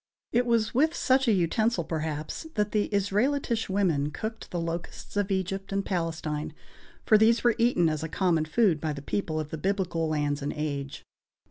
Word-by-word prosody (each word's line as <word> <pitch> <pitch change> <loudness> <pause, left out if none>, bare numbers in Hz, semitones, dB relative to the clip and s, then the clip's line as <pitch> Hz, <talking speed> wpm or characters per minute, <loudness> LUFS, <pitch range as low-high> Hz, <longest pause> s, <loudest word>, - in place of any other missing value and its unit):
It 245 +1 +2
was 230 -2 +2
with 310 +6 +3
such 265 0 +2
an 220 - +5
utensil, 185 +3 +1
perhaps, 155 - -4
that 210 0 0
the 210 -1 +1
Israelitish 225 +4 0
women 175 -8 +1
cooked 220 +8 -6
the 175 - -3
locusts 170 +4 -5
of 205 -1 0
Egypt 195 0 -2
and 195 0 -1
Palestine, 160 -4 -3 0.5
for 215 - +6
these 230 +2 +4
were 240 -1 +5
eaten 230 -8 +3
as 155 -1 -1
a 160 - -4
common 165 -2 +1
food 170 -2 +2
by 155 -2 -1
the 140 -1 -8
people 155 -2 -2
of 150 -1 -5
the 160 - -4
biblical 180 -3 0
lands 145 -1 0
and 145 - -2
age. 140 -2 -4
185 Hz, 185 wpm, -27 LUFS, 155-220 Hz, 0.5 s, for